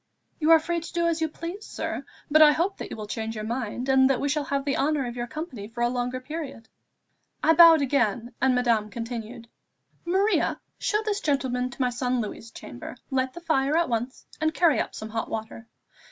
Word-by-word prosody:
"You 310 0 +1
are 330 - +9
free 340 +2 -2
to 330 - -9
do 340 0 +1
as 335 -1 0
you 320 - +1
please, 340 +7 -7
sir; - - -4 0.3
but 310 +1 +6
I 300 -1 +8
hope 370 +5 0
that - - -6
you - - -7
will 215 - -5
change 225 +1 -4
your 215 - -4
mind, 240 +2 -3
and 265 0 +5
that 270 - +2
we 285 - -1
shall 295 0 0
have 280 0 -1
the 280 - 0
honour 290 -1 +1
of 240 0 -5
your 240 0 -3
company 305 - -6
for 235 +2 -7
a 240 - +3
longer 250 +1 -2
period." 275 -5 -7 0.8
I 320 - +6
bowed 325 -2 +8
again, 240 -3 0
and 260 -1 +3
Madame 230 -4 +2
continued 230 +1 -6 0.6
"Maria, 385 +5 +1 0.2
show 425 0 0
this 415 -2 0
gentleman 255 -4 0
to 255 - -8
my 250 - +1
son 250 0 -1
Louis' 220 0 -5
chamber; 120 - -9
light 260 -1 0
the 345 - -9
fire 305 -2 +1
at 340 -3 +2
once, 240 +2 -3 0.2
and 315 0 +1
carry 335 -5 +4
up - - -3
some 215 - -6
hot 225 0 -3
water. 225 +1 -6
265 Hz, 215 wpm, -26 LUFS, 235-315 Hz, 0.8 s, are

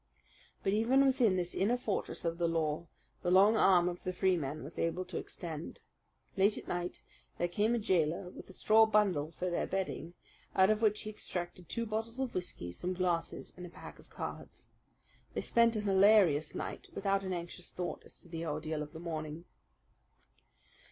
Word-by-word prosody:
But 195 - +1
even 250 +6 +4
within 255 -7 +4
this 180 -1 -1
inner 220 +6 +2
fortress 215 -6 -2
of 165 +1 -1
the 170 - +2
law 165 0 -1 0.3
the 175 - -1
long 195 +4 +6
arm 180 -5 +5
of 175 0 -4
the 185 - -1
Freemen 170 -6 0
was 150 +4 -8
able 170 +2 -1
to 180 - -6
extend. 160 -3 -7 0.6
Late 200 +2 +3
at - - -8
night 175 0 -3 0.3
there 175 - +1
came 210 +6 +1
a - - +1
jailer 180 -4 +1
with - - -11
a - - -10
straw 220 +3 +5
bundle 195 -9 +2
for 180 +2 -3
their 175 - 0
bedding, 180 -3 -3 0.4
out 190 +2 +6
of 215 0 0
which 210 -1 +3
he 215 - -5
extracted 175 -4 -5
two 230 - -1
bottles 225 +3 -3
of 265 -2 -2
whisky, 130 - -4
some 180 - -3
glasses, 175 -2 -2
and 180 - -9
a 180 - -7
pack - - -11
of - - -17
cards. - - -7 0.7
They - - 0
spent 235 0 +3
a 215 - 0
hilarious 195 -6 +4
night, - - -5
without 195 0 +1
an 190 - -3
anxious 175 0 -5
thought 180 -1 -4
as - - -14
to - - -17
the 165 -1 -5
ordeal 155 -1 -3
of 150 +1 -7
the 160 - -7
morning. 160 -1 -5
180 Hz, 185 wpm, -33 LUFS, 170-210 Hz, 0.7 s, long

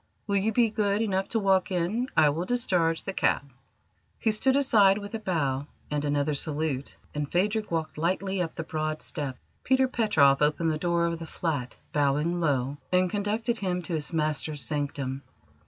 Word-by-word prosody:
"Will 200 -1 +1
you 205 +3 +1
be 230 0 +3
good 205 -1 +1
enough 195 -3 0
to 230 - 0
walk 195 -2 +2
in? 185 +8 0
I 155 -2 +6
will 165 +5 -2
discharge 180 -8 +1
the 195 - -4
cab." - - +1 0.7
He 220 - +1
stood 260 +5 +2
aside 210 -8 +5
with 205 0 -7
a 225 - -2
bow 145 -9 -1 0.2
and 150 -1 -1
another 145 0 +1
salute, 145 -2 -3 0.2
and 145 -1 -3
Phadrig 210 +4 +1
walked 160 -2 -3
lightly 190 +3 0
up 165 -2 -3
the 165 - -4
broad 155 0 -3
steps. 135 -4 -4 0.3
Peter 260 0 +3
Petroff 160 - +3
opened 155 +2 +2
the 155 - -2
door 170 0 +1
of 170 -1 -2
the 165 - -7
flat, 145 -9 -3 0.2
bowing 150 +4 +1
low, 140 -4 0
and 180 0 +3
conducted 215 +3 -1
him 180 -2 -1
to 170 - -4
his 155 0 -1
master's 155 -2 -1
sanctum. 140 -2 -3
170 Hz, 180 wpm, -27 LUFS, 150-200 Hz, 0.7 s, I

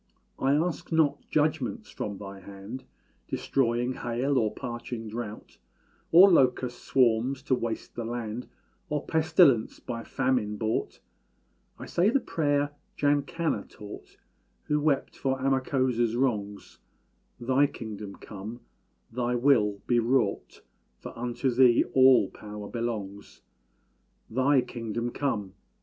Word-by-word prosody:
I 135 +1 +3
ask 170 +2 -1
not 160 -3 +2
judgments 150 -4 0
from 100 -1 -5
thy 100 -1 -9
hand 100 +7 -9 0.4
Destroying 120 -1 0
hail 125 +4 -1
or 110 -2 +1
parching 120 -1 -6
drought, 110 -1 -7 0.5
Or 180 +4 +9
locust 125 -5 +2
swarms 130 +1 +2
to 140 - 0
waste 115 -3 -3
the 120 - -4
land, 115 0 -4 0.4
Or 150 -1 -2
pestilence, 160 -7 +3
by 115 -2 -5
Famine 125 -6 0
brought; 110 +1 -2 0.8
I - - -8
say 180 +4 +2
the 275 - +3
prayer 145 - 0 0.3
Jankanna 145 - 0
taught, 105 -1 -11 0.5
Who 150 0 0
wept 145 -2 0
for 135 -1 -1
Amakósa's 130 -3 +1
wrongs 105 -6 -2 0.6
"Thy 130 +4 +3
kingdom 105 -5 -8
come 105 +3 -9 0.5
Thy 125 +1 -1
will 115 -6 +3
be 120 -1 +3
wrought 115 -3 0 0.3
For - - -10
unto 125 +2 -1
Thee 125 -1 +5
all 130 -6 +6
power 105 -1 -8
belongs." 105 -4 -5 0.9
Thy 130 +3 +3
kingdom 120 -1 -4
come! 105 -10 -2
120 Hz, 120 wpm, -28 LUFS, 110-135 Hz, 0.9 s, Or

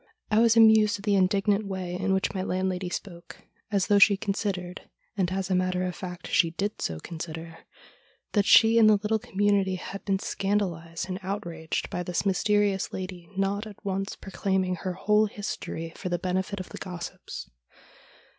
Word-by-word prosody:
I 215 - +4
was 230 0 +5
amused 220 -1 +6
at 200 - -11
the 205 - +2
indignant 200 +2 +2
way 185 -2 -4
in 190 +2 -1
which 190 +1 +1
my 190 - -2
landlady 185 -1 -1
spoke, 175 -1 -8 0.2
as 200 -3 +1
though 205 -1 +4
she 200 -1 +7
considered 195 -3 -3
— - - -43
and 185 -3 0
as 190 0 -2
a - - +3
matter 185 0 +1
of 180 -1 -3
fact 180 -1 -7
she 170 - +3
did 200 +5 -3
so 80 -1 -2
consider 165 - -7 0.4
— - - -36
that 205 -2 +2
she 225 +1 +7
and 215 -1 +7
the 215 - +7
little 215 +2 0
community 200 -3 +1
had 195 +2 -7
been 195 -1 +1
scandalised 185 -4 -2
and 185 0 -4
outraged 170 -4 -4
by 180 - -2
this 180 +2 -2
mysterious 200 0 +1
lady 185 -2 -6
not 200 +2 0
at 210 0 -13
once 195 0 -2
proclaiming 190 -1 -1
her 185 +1 -3
whole 210 +3 +3
history 165 -5 -5
for 185 - -5
the 175 - 0
benefit 185 +3 -2
of 185 - -7
the - - -9
gossips. 180 -2 -7
190 Hz, 185 wpm, -27 LUFS, 180-205 Hz, 0.4 s, she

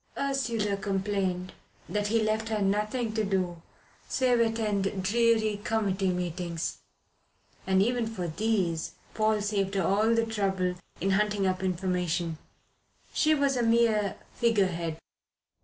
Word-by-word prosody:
Ursula 230 -7 0
complained 195 -2 -1 0.3
that 210 0 -1
he 225 +1 +2
left 220 +1 0
her 215 -1 0
nothing 210 +4 0
to 220 -1 0
do 185 -4 -1 0.5
save 250 -2 +2
attend 210 -4 0
dreary 220 0 +2
committee 200 -4 0
meetings; 175 -1 -3 0.9
and 190 0 +4
even 240 0 0
for 185 -6 -4
these 180 -2 0 0.2
Paul 215 -1 +2
saved 200 -1 -1
her 195 - +2
all 215 +5 +3
the 230 0 +2
trouble 195 -5 0 0.3
in 195 - +1
hunting 205 0 +2
up 185 0 0
information. 180 -3 -1 0.7
She 310 0 +3
was 280 -2 +2
a 245 - +1
mere 225 -3 +3 0.2
figurehead. 185 -8 +1
205 Hz, 125 wpm, -28 LUFS, 185-225 Hz, 0.9 s, and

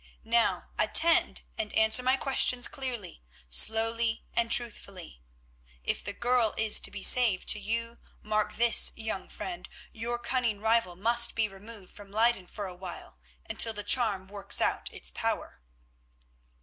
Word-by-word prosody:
Now, 230 +1 0
attend 335 0 +3 0.2
and 215 -1 -3
answer 220 +2 +4
my 255 +1 +1
questions 255 -2 +2
clearly, 245 - -7 0.3
slowly 225 - +1
and 235 0 0
truthfully. 200 - -1 0.6
If - - -3
the 205 - -5
girl 240 0 0
is 220 -1 +4
to - - -3
be 200 -2 -8
saved 230 -7 +4
to 215 - +3
you, 230 +3 -5 0.2
mark 215 0 -2
this, 235 0 +4
young 220 -4 -6
friend, 355 -2 -8 0.2
your 235 +2 -5
cunning 240 -4 -2
rival 220 -4 0
must 235 +5 +3
be 225 -1 0
removed 200 0 -13
from 205 -1 -14
Leyden 220 -2 0
for 205 +2 -7
a 185 -2 -8
while 180 - -11 0.3
until 225 - +2
the 210 -1 -6
charm 205 -4 +2
works 200 0 +1
out - - -1
its - - -6
power." - - -5
220 Hz, 150 wpm, -28 LUFS, 205-235 Hz, 0.6 s, answer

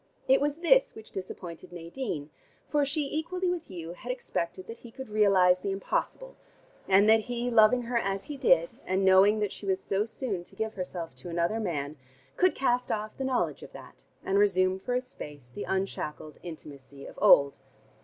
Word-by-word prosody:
It 265 +1 +5
was 290 0 +1
this - - +3
which 220 - -12
disappointed 180 -3 -8
Nadine: 170 - -5 0.4
for 295 -1 +2
she 290 +2 0
equally 345 +6 -2
with 345 -2 -4
Hugh 170 -3 -7
had 245 +7 -6
expected 185 -7 -4
that 230 - -9
he 240 - -12
could 265 +1 -9
realize 195 -4 +4
the 200 - -3
impossible, - - -3 0.5
and 195 +2 +5
that 220 0 +7
he, 245 +2 -3
loving 230 +2 +5
her 235 0 0
as 195 -2 -2
he 295 - -7
did 175 - +2
and 190 +1 +1
knowing 190 +3 +6
that 210 - 0
she 200 - -9
was 190 -1 +1
so 200 +2 -1
soon 220 -5 -4
to - - -16
give 220 0 -3
herself 175 -5 -5
to 130 - -9
another 170 +6 0
man, 150 -7 -3 0.4
could 370 0 +3
cast 250 -2 +1
off 215 0 -3
the 270 - -4
knowledge 260 -2 0
of - - -11
that, - - -13 0.2
and 195 +1 +2
resume 185 -2 +3
for 245 +5 -2
a 250 - +1
space 145 - -10
the 205 - -6
unshackled 190 -5 -3
intimacy 140 -4 -10
of - - -11
old. 140 0 +6
200 Hz, 190 wpm, -28 LUFS, 175-250 Hz, 0.5 s, that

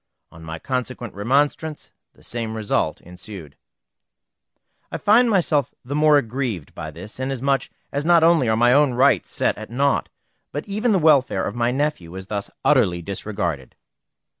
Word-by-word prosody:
On 80 - -14
my 80 0 -6
consequent 125 +2 -4
remonstrance 145 +8 -1 0.2
the - - -21
same 115 -2 -4
result 110 -2 -1
ensued. 90 -3 -11 1.4
I - - -3
find 230 +4 +4
myself 165 -8 +1
the 135 - -5
more 150 0 +5
aggrieved 120 - -3
by - - -6
this, 105 +5 -10
inasmuch 135 0 -1 0.2
as 140 +1 -2
not 170 0 +5
only 165 -8 +4
are 110 - +2
my 120 +1 +4
own 140 -2 +3
rights 125 - +3
set - - +1
at 110 - -8
naught, 140 +3 0 0.4
but 145 - -5
even 215 +4 0
the 200 - +4
welfare 145 - +3
of - - -3
my 120 0 0
nephew 125 - -2
is 95 0 -7
thus 100 0 -4 0.2
utterly 105 -12 +3
disregarded. 85 - -4
125 Hz, 160 wpm, -22 LUFS, 100-145 Hz, 1.4 s, more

